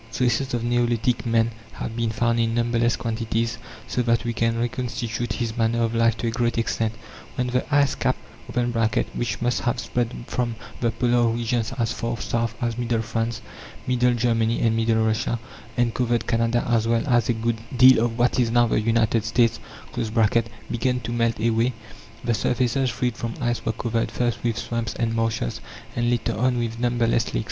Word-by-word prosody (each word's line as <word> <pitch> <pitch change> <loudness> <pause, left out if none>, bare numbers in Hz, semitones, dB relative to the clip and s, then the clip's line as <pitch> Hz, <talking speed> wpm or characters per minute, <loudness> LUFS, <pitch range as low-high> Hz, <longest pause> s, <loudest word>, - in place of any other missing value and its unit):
Traces 125 +2 +1
of 115 - -2
neolithic 120 0 +1
man 115 0 +2 0.2
have 115 - -5
been 115 -1 0
found 115 +1 +1
in 115 0 +1
numberless 120 0 +2
quantities, 115 0 -2 0.3
so 120 +2 -1
that 115 -1 +2
we 120 - -1
can 115 0 +1
reconstitute 120 -1 -2
his 115 -3 -3
manner 115 0 +1
of 115 0 0
life 115 -1 +3
to 110 - -3
a 115 - +1
great 120 0 0
extent. 115 -1 0 0.4
When 125 - 0
the 125 +1 0
ice 140 -1 +4
cap - - 0 1.0
(which 120 0 -2
must 120 0 +1
have 120 +1 0
spread 120 -1 -1
from 120 -2 -2 0.2
the 120 - +1
Polar 120 0 +2
regions 115 0 0
as 115 -2 0
far 115 0 -3
south 115 -1 -1
as 120 0 -1
middle 115 -2 0
France, 115 0 -2 0.4
middle 125 -1 +2
Germany, 115 -1 +1
and 115 -1 +3
middle 110 0 +2
Russia, 110 +1 0 0.4
and 120 -1 +2
covered 120 -1 0
Canada 115 0 +1
as 115 -2 +2
well 115 0 +2
as 120 -4 +2
a - - +4
good 115 0 -1 0.2
deal 130 -2 +8
of 115 -1 -1
what 125 +1 +2
is 120 -2 +3
now 120 +1 +4
the 115 - +1
United 115 0 +2
States) 115 +1 +2 1.1
began 125 +2 0
to 115 +1 -5
melt 115 -1 0
away, 115 +2 +2 0.5
the 120 -1 +1
surfaces 125 +4 +1
freed 120 0 -1
from 115 -1 -4
ice 120 -1 -1
were - - 0
covered, 115 +1 -1
first, 120 -2 -1
with 115 -1 0
swamps 115 -1 -3
and 115 -1 -1
marshes, 115 - -1 0.3
and 120 0 +1
later 115 -2 0
on 125 +3 +1
with 115 -1 -2
numberless 120 -1 +1
lakes. - - +2
115 Hz, 185 wpm, -24 LUFS, 115-120 Hz, 1.1 s, deal